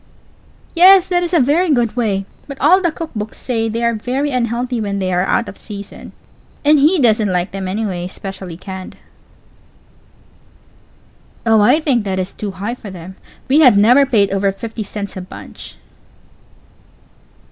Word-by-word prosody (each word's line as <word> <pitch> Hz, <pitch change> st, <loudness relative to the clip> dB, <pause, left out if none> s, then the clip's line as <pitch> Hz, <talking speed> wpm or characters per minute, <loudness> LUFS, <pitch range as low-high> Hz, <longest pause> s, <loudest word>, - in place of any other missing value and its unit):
Pause. -, -, -32 dB
Yes, 375 Hz, +1 st, +6 dB
that 355 Hz, -1 st, +1 dB
is 350 Hz, -1 st, -3 dB
a 345 Hz, -, +3 dB
very 305 Hz, +7 st, +2 dB
good 240 Hz, -5 st, +1 dB
way; 205 Hz, -5 st, -1 dB, 0.2 s
but 280 Hz, -2 st, -8 dB
all 370 Hz, +2 st, +4 dB
the 345 Hz, -3 st, +1 dB
cook 325 Hz, 0 st, -7 dB
books 210 Hz, 0 st, -5 dB
say 225 Hz, -3 st, -2 dB
they 230 Hz, +2 st, -3 dB
are 235 Hz, 0 st, +2 dB
very 255 Hz, +6 st, -2 dB
unhealthy 245 Hz, -1 st, -2 dB
when 200 Hz, -1 st, -3 dB
they 185 Hz, -1 st, -2 dB
are 180 Hz, -, +2 dB
out 195 Hz, +5 st, 0 dB
of 195 Hz, -, -9 dB
season. 200 Hz, -1 st, -10 dB, 0.5 s
And_ 300 Hz, 0 st, +5 dB
he_ 320 Hz, +6 st, +4 dB
doesn't 220 Hz, -5 st, +2 dB
like 180 Hz, +1 st, -1 dB
them, 195 Hz, -1 st, -5 dB
anyway 190 Hz, -2 st, -3 dB
especially 185 Hz, -2 st, -8 dB
canned. 190 Hz, 0 st, -8 dB, 2.5 s
Pause. 225 Hz, -, +2 dB
Oh, 220 Hz, -, +5 dB
I 210 Hz, +9 st, +4 dB
think 270 Hz, -8 st, 0 dB
that 190 Hz, -1 st, -2 dB
is 185 Hz, 0 st, -3 dB
too 210 Hz, -, -5 dB
high 200 Hz, +4 st, -5 dB
for 235 Hz, -4 st, -10 dB
them; 185 Hz, 0 st, -10 dB, 0.3 s
we 280 Hz, +4 st, +4 dB
have 255 Hz, -9 st, +6 dB
never 245 Hz, +7 st, +5 dB
paid 205 Hz, -7 st, +2 dB
over 195 Hz, 0 st, +1 dB
fifty 225 Hz, +3 st, -7 dB
cents 205 Hz, -1 st, -6 dB
a 185 Hz, -, -5 dB
bunch. 180 Hz, -, -11 dB
220 Hz, 175 wpm, -17 LUFS, 195-270 Hz, 2.5 s, Yes